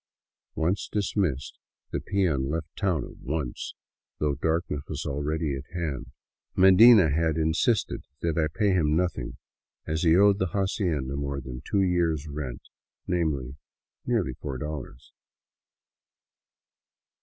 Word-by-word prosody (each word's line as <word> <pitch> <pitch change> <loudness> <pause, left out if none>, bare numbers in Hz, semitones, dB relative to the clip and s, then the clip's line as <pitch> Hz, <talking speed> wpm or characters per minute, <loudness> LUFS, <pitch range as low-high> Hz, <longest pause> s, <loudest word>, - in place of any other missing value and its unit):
Once 90 +5 0
dismissed, 95 -9 -1 0.3
the - - -1
peon 85 -9 0
left 80 +1 -4
town 90 -7 0
at - - -12
once, 70 -3 -4 0.4
though 75 -1 +1
darkness 80 0 -1
was - - -4
already 75 +1 -1
at 70 +2 -7
hand. 75 -7 -3 0.5
Medina 95 -1 +8
had 80 +1 +1
insisted 80 +8 +1 0.2
that 85 -2 -1
I 80 -1 +2
pay 100 +7 +1
him 80 -5 +2
nothing, 90 -7 -1 0.5
as 80 +1 -1
he 80 -2 +5
owed 100 0 +5
the 95 - +1
hacienda 90 -9 -1
more 70 0 -2
than 65 -1 -7
two 100 -1 +3
years' 85 -5 +1
rent 70 -4 -5 0.3
— - - -64
namely, 75 -7 -1 0.5
nearly 110 - 0
four 65 +1 -5
dollars. 70 -3 -7
80 Hz, 130 wpm, -27 LUFS, 70-90 Hz, 0.5 s, Medina